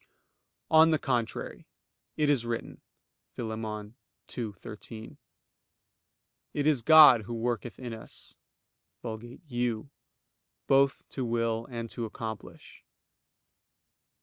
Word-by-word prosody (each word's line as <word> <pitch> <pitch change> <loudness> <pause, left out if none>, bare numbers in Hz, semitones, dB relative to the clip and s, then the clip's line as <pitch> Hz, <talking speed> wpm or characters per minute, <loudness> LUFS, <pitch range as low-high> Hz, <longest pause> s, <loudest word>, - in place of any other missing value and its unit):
On 160 0 +8
the 160 - +3
contrary, 120 -5 -2 0.5
It 150 - +2
is 140 -5 +3
written 115 -1 -4 0.5
(Phil. 115 -2 -4
2:13): 110 0 -8 1.4
"It 145 - 0
is 150 -5 +3
God 150 -3 +9
who 120 - -5
worketh 120 0 -2
in 125 -3 -6
us 110 - -11 0.7
[Vulgate 120 +7 -7
'you'] 120 -1 -2 0.7
both 135 0 +3
to 130 - -4
will 115 -1 -1
and 115 -2 -4
to 120 - -4
accomplish." 110 -1 -8
120 Hz, 95 wpm, -29 LUFS, 110-135 Hz, 1.4 s, God